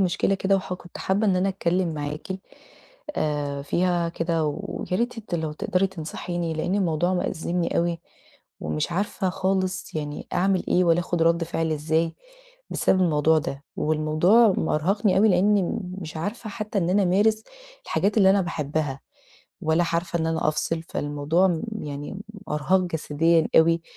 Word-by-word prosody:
مشكلة 190 +1 +2
كده، 195 +1 +2
وح 185 -1 -4
كنت 175 -1 -12
حابة 200 +3 +1
إن 185 -2 +3
أنا 185 +2 +2
أتكلم 180 -2 0
معاكِ 150 0 -5 0.9
آآ 145 -2 -1
فيها 175 +2 +1
كده، 165 -1 -1
وياريت 200 +7 -2
أنتِ 215 -5 -5
لو 160 -2 -2
تقدري 180 +5 0
تنصحيني، 175 -1 -4
لأن 160 +4 -1
الموضوع 175 -2 +1
مأزمني 175 0 -1
أوي، 170 -1 0 0.6
ومش 75 - -2
عارفة 190 +1 -1
خالص 185 -1 -1
يعني 150 -1 -4
أعمل 190 0 +1
إيه 180 - +3
والّا 170 0 +4
آخد 175 -1 -1
رد 165 0 +3
فعل 165 -1 -1
إزاي 160 +2 0 0.6
بسبب 185 - +2
الموضوع 160 -1 +3
ده، 140 -2 -5
والموضوع 155 +8 +3
مأرهقني 190 +6 +1
لأني 200 +2 +2 0.2
مش 160 -2 -7
عارفة 210 +6 -4
حتى 215 0 -3
إن 175 -1 0
أنا 200 +2 +3
أمارس 210 +4 +3 0.4
الحاجات 205 +2 0
اللي 190 -2 +6
أنا 200 +1 +4
باحبها، 150 -4 -2 0.6
ولا 160 +1 +2
عارفة 170 0 -1
إن 160 - 0
أنا 160 -1 0
أفصل. 160 +1 -1
فالموضوع 155 +4 +1 0.2
يعني 145 0 -6
م 195 - -7 0.3
إرهاق 150 +6 +2
جسديًا 165 -1 +1
أوي، 165 +1 +5
170 Hz, 150 wpm, -25 LUFS, 155-190 Hz, 0.9 s, اللي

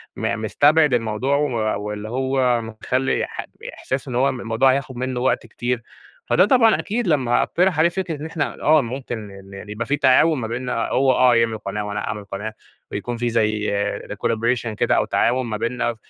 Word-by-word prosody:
م 115 0 -2
مستبعد 145 +6 +3
الموضوع 120 +4 0
و 115 -8 -1
واللي 105 +1 -5
هو 130 -1 +1
مخلي 120 +4 -1
ح - - -6 0.3
إحساس 130 +2 -4
إن 125 - -4
هو 135 +3 +3
م 130 - -6
الموضوع 120 +3 +2
هياخد 130 -2 -3
منه 130 0 -3
وقت 125 -2 0
كتير، 120 +1 -3 0.5
فده 185 - +4
طبعًا 230 -1 +4
أكيد، 225 +1 -2
لما 130 -7 +2
أقترح 180 -2 +1
عليه 165 +2 +5
فكرة 175 -2 -3
إن - - -5
إحنا 160 -2 -3
آه 155 0 +5
ممكن 125 0 -5
إن 100 0 -13
إن 100 +1 -9
يبقى 105 +3 -4
في 145 +3 0
تعاون 150 +3 +4
ما 115 - -3
بيننا، 120 0 -2
هو 130 0 +3
آه 125 -1 +4
يعمل 115 -1 +2
قناة 105 0 -4
وأنا 105 0 -3
أعمل 105 -1 -5
قناة 105 +2 -5 0.4
ويكون 120 +4 -4
في 120 0 -1
زي 110 -2 0 0.4
ل 105 - -4
Collaboration 115 +1 0
كده، - - +2
أو - - +2
تعاون 125 +1 +1
ما 110 -2 -3
بيننا 120 +1 -2
120 Hz, 195 wpm, -21 LUFS, 110-135 Hz, 0.5 s, عليه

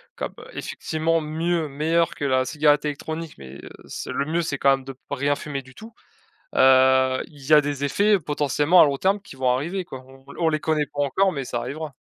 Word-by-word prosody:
comme, - - -5
heu, - - -12
effectivement 160 +1 -1
mieux, 160 +1 -1
meilleure 160 +4 0
que 145 - -4
la 130 -1 +2
cigarette 150 +2 +2
électronique 155 +2 -5
mais, 70 0 -11
heu, - - -9 0.2
c'est - - -6
le 140 - -1
mieux 165 +3 0
c'est 145 -4 -3
quand 140 - +4
même 135 -1 0
de 135 - -7
p 130 - -31
rien 145 +2 +1
fumer 140 -2 -5
du 130 0 -18
tout. 225 +1 -12 0.6
Heu, 130 0 +5
il 145 -3 -16
y 150 - -1
a 150 - +9
des 145 -1 -4
effets 200 +7 +2
potentiellement 150 +3 +2
à - - +9
long 140 -2 0
terme 195 +6 +1
qui 165 - -13
vont 130 -1 0
arriver 170 +9 -1
quoi. 130 -6 -10
On 135 0 -17
on 165 -2 +2
les 155 -1 -1
connaît 155 -2 0
pas 145 - -2
encore 190 +7 +2
mais 140 -3 -4
ça 120 - -3
arrivera. 140 +5 -5
145 Hz, 230 wpm, -23 LUFS, 135-160 Hz, 0.6 s, a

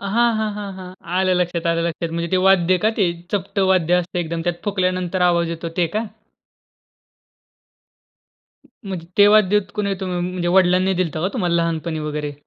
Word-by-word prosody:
हां, 240 0 +4
हां, 215 -1 -1
हां, 200 -2 -6
हां 185 0 -9 0.3
आलं 185 -1 +2
लक्षात, 175 -1 -1
आलं 165 0 +1
लक्षात. 170 0 -4
म्हणजे 170 0 -2
ते 185 - +3
वाद्य 185 -1 +4
का - - +5
ते, 180 -3 +3 0.2
चपट 200 0 -2
वाद्य 175 -2 +2
असतं, 180 0 0
एकदम 165 0 -3
त्यात 175 -1 -3
फुकल्यानंतर 185 -2 -1
आवाज 170 -1 0
येतो 165 0 -5
ते 170 - +2
का? 225 - -1 2.8
म्हणजे 180 -4 -6
तेव्हाच 205 0 +6
देत 210 0 +3
कुणी 205 -1 -1
होत 195 0 -3
मग? 180 -1 -2
म्हणजे 180 -1 -3
वडिलांनी 185 +1 +3
दिलता 160 -2 -3
का 185 - +1
तुम्हाला 175 -8 0
लहानपणी 165 -1 -1
वगैरे? 150 -1 -4
180 Hz, 175 wpm, -20 LUFS, 170-190 Hz, 2.8 s, तेव्हाच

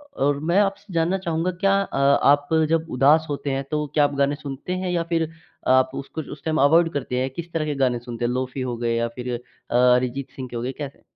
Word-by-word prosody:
और 140 +1 +1
मैं 170 +6 +2
आपसे 195 -1 -2
जानना 170 +3 +1
चाहूँगा 170 -1 -1
क्या 195 0 +4
अ, 195 - -4
आप 140 +1 +4 0.2
जब 165 0 +1
उदास 145 +5 +4
होते 140 -1 -2
हैं, 135 +1 -1
तो 150 0 0
क्या 150 - +5
आप 145 - +1
गाने 140 +1 +2
सुनते 145 +4 -6
हैं 185 0 -2
या 170 -1 0
फिर 165 -2 0 0.4
आप 130 0 +4
उसको 140 +3 -5
उस 145 - -13
टाइम 155 -1 0
अवॉइड 165 +4 +5
करते 125 -3 -2
हैं 130 - -1
किस 170 +4 -7
तरह 155 -2 0
के 150 - -2
गाने 125 -3 +1
सुनते 120 0 -5
हैं, 120 - 0
लोफी 130 +1 -3
हो 125 -2 -3
गए 115 -1 0
या 115 0 +1
फिर 125 0 -3 0.4
अ, - - 0
अरिजीत 125 +2 +2
सिंह 130 -2 -6
के 120 - -8
हो 115 - -3
गए 130 - -2
कैसे? 140 -2 -8
140 Hz, 240 wpm, -23 LUFS, 130-165 Hz, 0.4 s, क्या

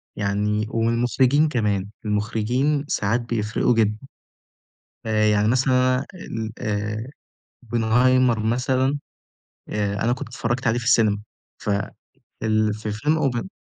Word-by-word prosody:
يعني 105 +1 0
والمخرجين 120 +6 +2
كمان، 105 -7 -1 0.2
المخرجين 115 +8 0
ساعات 115 +1 0
بيفرقوا 115 0 0
جدًا. 105 -2 +2 1.1
فيعني 110 -1 +2
مثلًا 130 +1 +3
أنا 130 - -3
ال 115 -11 -5
آآ، 105 +2 -3 0.6
Oppenheimer 120 +2 +3
مثلًا 130 +5 +1 0.7
آآ 100 -1 -1
أنا 120 - +2
كنت 125 - -4
اتفرجت 120 +1 -2
عليه 115 +2 +2
في 120 - -5
السينما 110 -4 +3 0.4
ف - - -3 0.7
فال 110 -1 +2
في 105 0 -5
فيلم 150 +7 +1
open 120 +9 -3
115 Hz, 115 wpm, -23 LUFS, 105-125 Hz, 1.1 s, مثلًا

